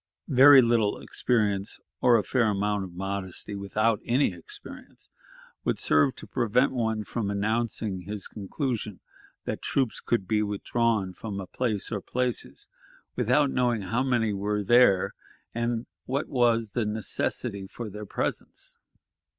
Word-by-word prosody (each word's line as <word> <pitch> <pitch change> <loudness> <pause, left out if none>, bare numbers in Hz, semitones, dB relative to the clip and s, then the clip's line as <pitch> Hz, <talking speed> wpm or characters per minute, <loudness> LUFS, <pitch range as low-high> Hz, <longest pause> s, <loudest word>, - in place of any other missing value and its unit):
Very 135 +1 +9
little 115 -3 +2
experience 105 -5 0 0.2
or 120 -1 +6
a 105 - 0
fair 115 +3 +2
amount 105 0 0
of 90 - -11
modesty 95 +1 -4
without 105 +2 0
any 125 -4 +2
experience 85 -2 -12 0.5
would - - 0
serve 75 - +3
to - - -9
prevent 125 +1 +1
one 110 -4 -1
from 105 +2 -3
announcing 110 -1 -1
his 100 +2 -4
conclusion 110 - -4 0.5
that - - -3
troops 130 -5 0
could 115 -6 -1
be 105 +1 +2
withdrawn 105 -1 0
from 100 +1 -6
a 95 - -5
place 110 0 -2
or 105 -3 -2
places 125 +2 -2 0.5
without 135 +4 +2
knowing 120 -4 +1
how 115 +6 0
many 120 -5 +1
were 105 +1 -1
there, 120 -3 +4 0.4
and 120 0 -1 0.2
what 140 +3 -1
was 115 -3 +2
the 120 +3 -1
necessity 100 -2 -2
for 115 +3 -7
their 105 0 -8
presence. - - -3
110 Hz, 140 wpm, -27 LUFS, 100-120 Hz, 0.5 s, Very